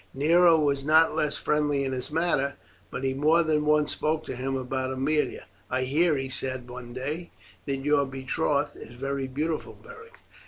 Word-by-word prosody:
Nero 165 +4 +5
was 140 -3 +1
not 160 +2 +5
less 150 -1 0
friendly 145 -2 +1
in 135 - -2
his 125 -1 -4
manner, 150 -4 0 0.3
but 125 - -6
he 135 0 +1
more 155 +5 +3
than 155 -1 +1
once 150 -1 +3
spoke 155 +1 -1
to - - -5
him 135 +2 -2
about 130 0 -3
Aemilia. 145 +4 0 0.3
"I 130 0 0
hear," 150 +4 +2
he 135 0 -3
said 130 -1 -3
one 125 -1 -9
day, 145 +7 -4 0.4
"that 140 - 0
your 140 0 +2
betrothed 140 +2 -1
is 115 - -11
very 135 +1 -3
beautiful 150 +4 -3
Beric." 465 0 -14
140 Hz, 180 wpm, -27 LUFS, 130-155 Hz, 0.4 s, Nero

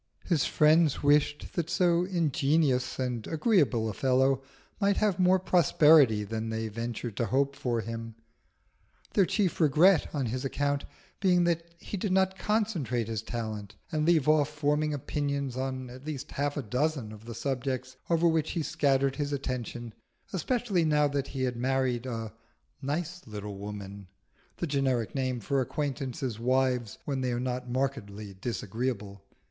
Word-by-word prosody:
His 165 -7 +2
friends 155 -1 +4
wished 145 0 +2
that 170 -2 -2
so 175 -1 +3
ingenious 155 -6 +1
and 125 -4 -2
agreeable 155 - +2
a 110 - -3
fellow 130 +2 +2 0.4
might 200 -1 +2
have 205 -4 +1
more 185 +1 +5
prosperity 150 - +5
than 110 +2 -4
they 110 0 -2
ventured 115 0 -4
to 115 - 0
hope 140 +5 +1
for 120 -4 -1
him, 115 0 -6 1.0
their 195 -3 +4
chief 195 -5 0
regret 160 +4 +5
on 140 -4 -1
his 125 +3 -3
account 140 +1 -1 0.3
being 180 -3 +4
that 170 0 -1
he 200 - -6
did 195 +1 -2
not 190 0 +3
concentrate 190 - 0
his 110 -2 -2
talent 110 -3 -5 0.2
and 155 -2 0
leave 160 -5 +4
off 150 -1 +4
forming 150 +1 0
opinions 140 -2 -2
on 130 -1 -3
at 130 +2 -11
least 145 -1 -6
half 145 +1 -1
a 145 - -2
dozen 125 0 -1
of 110 +1 -12
the 115 -1 -7
subjects 130 -1 -3
over 170 0 +3
which 160 -2 +1
he 165 - -1
scattered 135 -2 +1
his 145 -1 -2
attention, 120 -4 -4 0.4
especially 205 -2 0
now 150 -2 +3
that 140 -1 -2
he 135 -2 -3
had 125 -1 0
married 130 0 0
a 115 -3 -4 0.5
"nice 170 +5 -3
little 105 -2 -6
woman" 100 -1 -7 0.5
(the - - -2
generic 135 -6 0
name 130 -2 -1
for 135 +5 0
acquaintances' 130 -4 -3
wives 125 -2 +1
when 135 -2 -2
they 125 -1 0
are 120 - -1
not 125 0 -3
markedly 110 -6 -3
disagreeable). 105 -1 -4
135 Hz, 155 wpm, -29 LUFS, 120-155 Hz, 1.0 s, more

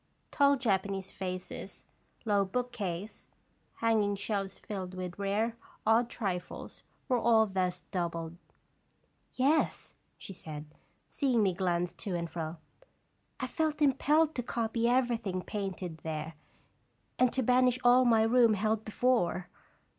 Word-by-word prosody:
Tall 280 0 +4
Japanese 195 -5 -1
vases, 185 -1 -5 0.4
low 205 -2 +3
bookcase, 210 -3 -4 0.5
hanging 215 -3 +2
shelves 200 -1 -2
filled 190 -3 -6
with 180 0 -6
rare, 210 +4 0 0.3
odd 230 +2 +4
trifles, 185 -7 -4 0.3
were 250 -2 +2
all 225 -1 +5
thus 185 -3 -1
doubled. 170 -3 -3 0.6
" - - -41
Yes," 285 +5 +1 0.2
she 195 - -9
said, 155 -4 -7 0.4
seeing 255 -6 +1
me 190 -2 +2
glance 175 -1 0
to 180 +2 -4
and 170 -1 -2
fro, 160 0 -5 0.4
" - - -44
I - - -1
felt 310 -2 -1
impelled 300 +2 +3
to 250 - -2
copy 230 0 0
everything 235 -7 +1
painted 190 -5 -4
there, 155 0 -4 0.9
and 255 -1 +4
to 260 - 0
banish 250 +1 +4
all 245 +1 +6
my 225 -3 +5
room 230 -1 +5
held 215 +2 0
before. 215 -6 +1
210 Hz, 130 wpm, -31 LUFS, 180-245 Hz, 0.9 s, all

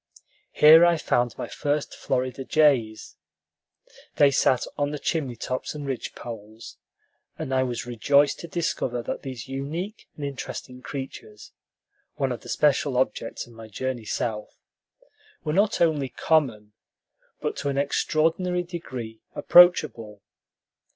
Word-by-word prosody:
Here 160 +3 +8
I 175 -1 +5
found 120 -5 0
my - - -4
first 145 0 -2
Florida 130 +1 -2
jays. 130 -8 +1 1.0
They 145 -1 +5
sat 130 -1 +2
on 145 0 0
the 150 - -4
chimney 140 -4 -2
tops 130 +5 -4
and 145 -1 -6
ridgepoles, 115 -4 -7 0.6
and 130 - -4
I 130 - +3
was 125 -2 -2
rejoiced 140 +4 +2
to 170 - -7
discover 130 -8 -2
that - - -4
these 130 -4 -7
unique 155 +10 -5
and 145 - -5
interesting 130 -2 -7
creatures, 130 -7 -8 0.6
one 135 -2 -1
of 125 - -5
the - - -12
special 145 -2 +2
objects 125 -3 -1
of 120 - -17
my 115 -1 -11
journey 120 +2 -4
South, 105 0 -3 0.9
were 150 - -2
not 200 +4 +2
only 150 -5 +2
common, 115 -12 0 0.7
but - - -3
to 145 - -2
an 140 - -2
extraordinary 165 +5 +1
degree 130 -11 -7
approachable. 115 - +4
135 Hz, 130 wpm, -25 LUFS, 120-150 Hz, 1.0 s, Here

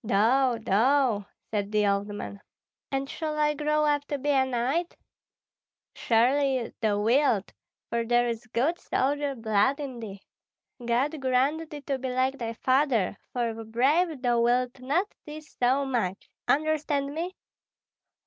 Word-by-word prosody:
"Thou, 235 +5 +3
thou!" 230 0 +2 0.2
said 205 -1 -2
the 210 -1 +2
old 200 0 +1
man. 205 -1 -7 0.5
"And 270 0 -1
shall 305 +1 -4
I 300 0 +2
grow 300 +1 +1
up 290 -1 +2
to 285 - -2
be 290 +2 0
a 265 -2 +3
knight?" 260 +8 -1 1.0
"Surely 255 +2 +2
thou 205 -2 +1
wilt, 230 -2 +2 0.3
for 235 0 -1
there 240 +1 +2
is 230 -1 -4
good 280 +10 0
soldier 285 +1 -1
blood 225 +4 +1
in 265 -4 -5
thee. 200 -4 -8 0.6
God 260 +6 0
grant 270 +5 +1
thee 295 -1 -8
to 275 -1 -3
be 260 0 -3
like 260 +2 0
thy 230 -1 -3
father; 255 -5 +1 0.2
for 240 -2 -1
if 225 0 -8
brave 275 +6 +1
thou 240 -1 +2
wilt 245 +2 +1
not 290 +10 +1 0.2
tease 305 +1 -10
so 260 +3 +2
much 225 -8 -2 0.2
understand 295 -2 +1
me?" 345 +4 -4
260 Hz, 150 wpm, -27 LUFS, 230-290 Hz, 1.0 s, Thou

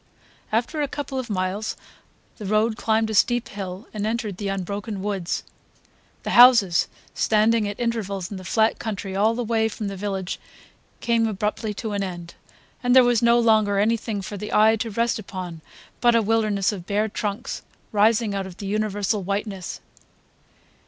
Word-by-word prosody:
After 235 +8 0
a 290 - +1
couple 275 -1 -4
of 255 - -5
miles 195 +2 -2 0.6
the 210 - -6
road 215 +2 +2
climbed 220 0 +1
a - - -3
steep 240 +3 +2
hill 195 +1 -6
and 210 -1 -3
entered 220 -4 -2
the 205 - -4
unbroken 195 +1 -4
woods. 195 -4 -2 0.8
The - - -3
houses 235 -8 +7 0.3
standing 220 0 +2
at 205 - -5
intervals 200 -6 -2
in 200 - -5
the 185 - -9
flat 220 +5 +2
country 200 -3 -4
all 215 +3 +3
the 245 - -2
way 220 -1 +1
from 210 -1 -4
the 195 - -5
village 195 -1 -3 0.6
came 230 -1 +2
abruptly 210 +1 -2
to 220 +1 -4
an 200 -1 -1
end, 175 -3 -5 0.5
and 245 0 +3
there 260 - +9
was 245 -2 +3
no 235 0 +5
longer 215 -3 +3
anything 215 -1 0
for 205 +2 -6
the 210 +2 -6
eye 220 +1 +5
to 225 +1 -3
rest 230 +2 0
upon 185 -5 -7 0.4
but 240 -1 +4
a 230 - +5
wilderness 215 -2 +1
of 185 -4 -7
bare 210 +1 +1
trunks 205 -1 -4 0.3
rising 215 0 +3
out 195 -1 -2
of 185 -1 -11
the 200 - -7
universal 205 0 0
whiteness. 200 -1 -4
210 Hz, 170 wpm, -24 LUFS, 195-225 Hz, 0.8 s, there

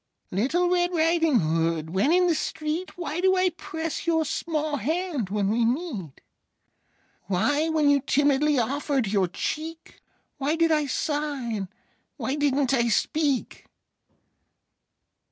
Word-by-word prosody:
Little 275 - +1
Red 355 0 +2
Riding 325 - +3
Hood, 160 0 0
when 195 - +2
in 360 +1 +4
the 345 - +3
street, 315 +3 -3
Why 345 -1 -3
do 375 0 +3
I 370 0 +3
press 320 -1 -5
your 320 -1 +2
small 305 -1 -2
hand 310 - -2
when 200 -1 0
we 235 +2 +2
meet? 230 - -3 1.1
Why, 285 - +1
when 310 -2 +2
you 285 -1 +4
timidly 290 +1 +2
offered 270 +2 0
your 195 -2 +1
cheek, 320 - -5 0.4
Why 290 +3 0
did 330 0 +2
I 300 -2 +2
sigh, 290 -3 -2
and 200 -3 -3 0.5
why 260 - -2
didn't 285 -2 +1
I 235 -3 +2
speak? 280 +3 0
290 Hz, 135 wpm, -25 LUFS, 235-325 Hz, 1.1 s, in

